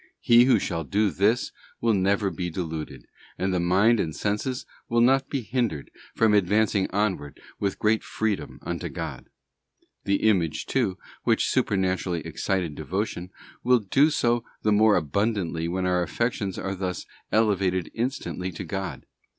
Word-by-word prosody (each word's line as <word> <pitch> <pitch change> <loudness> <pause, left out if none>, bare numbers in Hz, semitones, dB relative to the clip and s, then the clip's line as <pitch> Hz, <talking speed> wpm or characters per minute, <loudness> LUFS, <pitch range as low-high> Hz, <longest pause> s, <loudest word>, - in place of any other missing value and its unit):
He 120 +1 +6
who 130 - +5
shall 85 -3 -2
do 100 +6 +1
this 105 +8 +1 0.3
will 115 -1 +2
never 100 +1 +1
be 90 +1 -3
deluded, 80 -3 -5 0.3
and 95 0 0
the 90 - +1
mind 95 +7 +4
and 80 -4 -2
senses 105 +5 -2 0.2
will 115 - +2
not 135 +3 +4
be 135 -4 -2
hindered 115 - -2 0.2
from 110 -2 +4
advancing 105 0 +2
onward 95 -9 -2 0.2
with 100 -1 -1
great 110 +1 +2
freedom 110 -3 -2
unto - - -4
God. - - -6 0.8
The 100 0 +1
image, 85 -7 +1
too, 115 -9 0 0.2
which - - +2
supernaturally 95 -3 0
excited 85 +1 -2
devotion, 90 +4 -3 0.3
will 125 0 +5
do 130 +8 +3
so 120 -5 +1 0.2
the 105 - +3
more 105 0 +5
abundantly 85 0 0
when 90 +2 -1
our 90 -1 +2
affections 95 +3 -2
are 95 - -3
thus 90 -1 -4 0.3
elevated 95 -5 +1
instantly 115 -6 -3
to - - -6
God. 95 -2 -5
100 Hz, 150 wpm, -26 LUFS, 90-110 Hz, 0.8 s, He